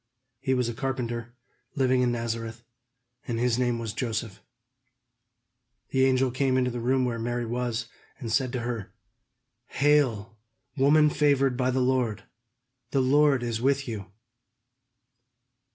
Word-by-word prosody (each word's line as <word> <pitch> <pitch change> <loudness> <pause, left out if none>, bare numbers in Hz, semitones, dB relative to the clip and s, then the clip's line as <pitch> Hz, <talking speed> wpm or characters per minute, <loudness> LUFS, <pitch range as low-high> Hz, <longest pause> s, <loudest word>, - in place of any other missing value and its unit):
He 130 -1 0
was 125 -2 +1
a 120 - -3
carpenter, 120 -2 -4 0.4
living 130 -2 +2
in 125 -1 +2
Nazareth, 115 -1 -4 0.6
and 115 - -2
his 120 0 +1
name 120 -2 +1
was 115 -2 -4
Joseph. 115 -4 -3 1.5
The 130 0 +3
angel 130 -1 +2
came 130 0 +1
into 125 -1 +1
the 120 - -4
room 130 +2 +1
where 120 -2 -2
Mary 120 +1 -2
was, 120 0 -2 0.3
and 115 -5 -6
said 130 +1 +1
to 125 - -2
her: 115 -4 -5 0.7
"Hail, 120 -7 +1 0.4
woman 150 +2 +4
favored 140 -3 +2
by 130 0 +1
the 130 0 +1
Lord; 125 -4 0 0.7
the 135 - +1
Lord 140 0 +4
is 115 -1 -2
with 135 +1 +1
you!" 105 -5 -5
125 Hz, 135 wpm, -27 LUFS, 115-130 Hz, 1.5 s, woman